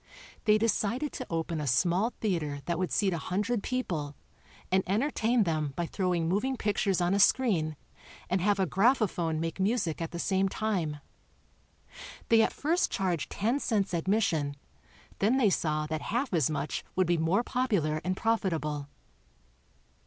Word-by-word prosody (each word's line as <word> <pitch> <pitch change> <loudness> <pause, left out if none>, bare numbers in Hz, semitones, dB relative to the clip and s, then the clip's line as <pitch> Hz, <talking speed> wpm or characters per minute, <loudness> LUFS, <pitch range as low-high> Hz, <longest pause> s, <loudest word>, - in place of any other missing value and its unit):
They 215 0 +5
decided 230 +5 0
to 255 - -6
open 165 -1 -2
a 145 - -3
small 175 - +2
theater 155 -9 -1
that 170 -1 -1
would 185 - -1
seat 195 -3 +2
a 170 - -2
hundred 205 +7 -1
people, 165 - -3 0.6
and 190 0 +3
entertain 230 +2 +2
them 155 -5 -1
by 170 - -1
throwing 180 -2 -1
moving 250 +9 0
pictures 200 -3 0
on 175 +2 +2
a 200 - +2
screen 190 -9 +3 0.5
and 185 0 0
have 200 +1 +2
a 190 - +3
graphophone 190 -7 +1
make 165 +2 -3
music 190 -5 0
at 165 - -2
the 170 - -6
same 190 +2 +1
time. 180 -9 -2 1.3
They 225 -1 +6
at - - +2
first 330 +5 0
charged 180 -5 -1
ten 230 +7 0
cents 205 -8 0
admission, 170 -5 +1 0.6
then 225 +6 +3
they 220 -7 +4
saw 155 -3 0
that 155 0 -3
half 240 +1 -2
as 160 -6 +2
much 150 -1 -3
would 185 - +3
be 175 -1 +1
more 170 +8 +2
popular 200 -13 0
and 185 +1 -1
profitable. 160 -10 -1
185 Hz, 160 wpm, -29 LUFS, 160-220 Hz, 1.3 s, They